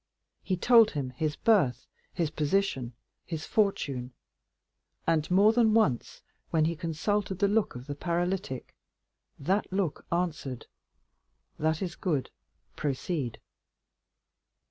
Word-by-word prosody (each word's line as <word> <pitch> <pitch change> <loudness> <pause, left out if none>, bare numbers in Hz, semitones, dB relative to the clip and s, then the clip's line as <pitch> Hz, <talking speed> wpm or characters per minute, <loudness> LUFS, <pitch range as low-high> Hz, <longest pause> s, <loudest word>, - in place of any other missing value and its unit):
He 185 - -1
told 230 +3 +6
him 135 -4 -3
his 150 +4 -2
birth, 185 - +2 0.3
his 165 -3 -1
position, 150 -6 0 0.3
his 160 -3 -5
fortune, 140 - 0 0.9
and 160 -2 +1
more 200 +4 +5
than 225 -2 +4
once, 145 - +1 0.3
when 160 -1 +2
he 170 +1 0
consulted 190 +5 -1
the 200 +1 +3
look 210 - +1
of 125 +1 -8
the 145 - -4
paralytic, 175 -3 -2 0.6
that 190 +9 0
look 190 -5 -2
answered, 155 -7 -2 0.9
"That 160 +3 +1
is 175 -2 -4
good, 150 -8 -1 0.4
proceed." 140 -3 -2
165 Hz, 115 wpm, -29 LUFS, 145-195 Hz, 0.9 s, told